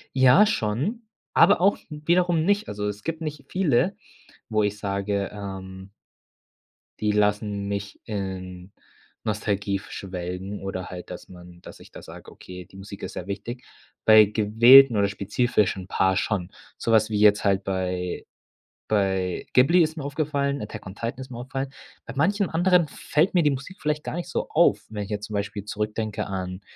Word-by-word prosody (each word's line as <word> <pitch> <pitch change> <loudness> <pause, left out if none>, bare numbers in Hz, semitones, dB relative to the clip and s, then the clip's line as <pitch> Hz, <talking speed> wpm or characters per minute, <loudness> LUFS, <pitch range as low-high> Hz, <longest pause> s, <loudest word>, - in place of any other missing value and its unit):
Ja, 130 +10 +7
schon, 200 - -2 0.3
aber 200 +3 +6
auch 195 +3 +4
wiederum 165 +2 +1
nicht. 205 +2 +1
Also 105 0 -4
es 105 0 -5
gibt 165 0 -4
nicht 150 -3 -5
viele, 185 - +1 0.5
wo 110 -1 +1
ich 105 0 0
sage, 100 -1 -2
ähm 95 -1 -8 1.1
die 105 -1 +1
lassen 105 -1 0
mich 100 0 -5
in 95 -3 -6 0.5
Nostalgie 100 -2 -1
f 100 - -13
schwelgen 90 +1 -6
oder 95 -1 -5
halt, 90 -1 -8
dass 90 - -9
man 90 -1 -14
dass - - -12
ich - - -16
da - - -10
sage: - - -12
„Okay, 90 0 -11
die 95 - -16
Musik 100 +1 -10
ist - - -5
sehr 90 - -6
wichtig.“ 110 +5 -6 0.4
Bei 110 -1 +8
gewählten 115 +4 +7
oder 100 - +3
spezifischen 100 -1 0
Paar 95 -1 +1
schon. 95 -5 -1 0.3
So 115 - -2
was 110 -1 +4
wie 105 - -1
jetzt 105 -1 +5
halt 100 -1 +2
bei 90 -2 -3 0.6
bei 95 -3 0
Ghibli 165 +8 +5
ist 160 +1 -3
mir 145 - -5
aufgefallen, 140 -2 -1
Attack 105 0 -8
on 95 - -9
Titan 115 +4 -4
ist 130 0 -8
mir 120 - -8
aufgefallen. 135 +2 -4 0.3
Bei - - -7
manchem 200 +5 +2
anderem 175 0 +3
fällt 160 +6 0
mir 170 - +4
die 150 - +3
Musik 140 +8 -6
vielleicht 150 0 -1
gar - - -4
nicht 175 - -4
so - - -3
auf, 170 +2 +3
wenn 105 -2 -4
ich 100 - -9
jetzt 105 0 -3
zum 105 - -6
Beispiel 100 0 -3
zurückdenke 105 0 -3
an, 95 -1 -5
105 Hz, 175 wpm, -25 LUFS, 100-140 Hz, 1.1 s, Bei